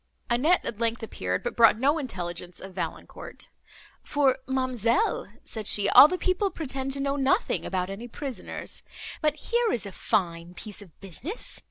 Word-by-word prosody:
Annette 300 +10 +3
at 220 - -4
length 230 0 -1
appeared, 90 - -3
but - - -3
brought 230 -2 +6
no 285 +6 +2
intelligence 175 - -5
of 190 0 -10
Valancourt, - - -6 0.5
"For, 275 -3 +2
ma'amselle," 260 - 0
said 220 -3 -6
she, 205 -1 +5
"all 285 - +10
the 365 - -2
people 370 +2 +1
pretend 270 -5 -3
to 275 - -1
know 275 0 0
nothing 285 - +1
about 185 0 -2
any 220 +5 -6
prisoners. 265 +2 -5 0.4
But 305 -2 +2
here 475 -1 0
is 225 - -1
a 200 - -6
fine 175 -2 -1
piece 210 +1 -7
of 185 -6 -16
business! 235 - -5
240 Hz, 165 wpm, -27 LUFS, 195-290 Hz, 0.5 s, all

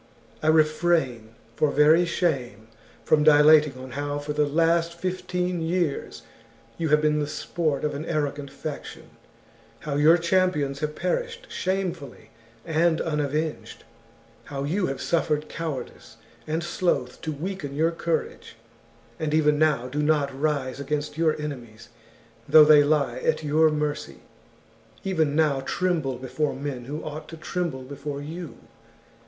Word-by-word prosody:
I 155 - -2
refrain, 155 -7 +2 0.2
for 150 - +2
very 155 +4 +5
shame, 130 - -2 0.4
from 150 -1 +4
dilating 150 -2 +6
on 130 0 -9
how 145 +2 -3
for 145 +1 -4
the 150 0 +1
last 165 +2 +2
fifteen 180 0 -2
years 165 -7 -2 0.6
you 165 -2 0
have 150 +1 +3
been 150 0 +2
the 145 - -1
sport 155 -1 -2
of 150 - -1
an 145 +3 -5
arrogant 145 -2 -2
faction; 145 +2 -8 0.7
how 145 -2 -3
your 155 +4 +6
champions 170 -5 +1
have 150 0 -3
perished 485 -1 -3
shamefully 180 - -3 0.3
and 160 +1 +2
unavenged; 150 0 -2 0.6
how 140 -1 -5
you 180 +7 0
have 135 - -4
suffered 155 -2 0
cowardice 155 -7 -6 0.3
and 160 +2 -1
sloth 175 +1 -1
to 155 - -3
weaken 150 -2 -5
your 160 +3 +2
courage; 165 0 -3 0.6
and 155 -1 0
even 150 -1 +3
now 150 -6 +2
do 145 +4 -2
not 150 -2 +1
rise 140 -4 -1
against 145 +1 -3
your 155 -1 +1
enemies 120 -7 -7 0.6
though 155 -1 +9
they 150 -1 +7
lie 145 -4 +1
at 155 - 0
your 155 +2 +4
mercy; 150 - -3 0.8
even 160 -7 0
now 150 -3 +2
tremble 150 -2 -1
before 130 +4 -2
men 135 -3 -5
who 150 +4 -5
ought 155 0 -7
to 165 - -9
tremble 160 -5 -3
before 140 +2 -6
you. 160 +3 -7
150 Hz, 140 wpm, -25 LUFS, 140-165 Hz, 0.8 s, though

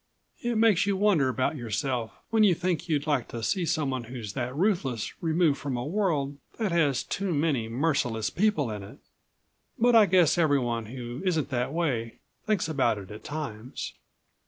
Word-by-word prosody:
"It 240 -1 -1
makes 215 -4 +4
you 200 -1 +1
wonder 190 -10 +3
about 130 +4 0
yourself 120 -1 -2 0.2
when 225 -1 +3
you 210 - +7
even 170 - +1
think 175 -2 -1
you'd 145 -3 +1
like 145 -6 0
to 115 -1 -6
see 180 - 0
someone 135 -6 -1
who's 115 -4 -7
that 125 +1 -3
ruthless 150 - 0
removed 160 -3 +2
from 135 -3 -3
a 120 - -3
world 150 -7 0 0.2
that 215 -5 -1
has 145 -7 +2
too 190 -4 -2
many 145 -7 0
merciless 125 -4 0
people 180 - +1
in 105 -1 -5
it. 100 - -11 0.8
But 240 +1 +4
I 215 -3 +7
guess 175 -3 +4
everyone 125 -8 +1
who 120 +1 -6
isn't 160 -6 0
that 125 -1 -1
way... 130 -9 -1 0.3
thinks 215 -6 +1
about 135 -8 +1
it 95 -1 -9
at 105 - -9
times." 130 -6 -5
145 Hz, 180 wpm, -27 LUFS, 120-175 Hz, 0.8 s, you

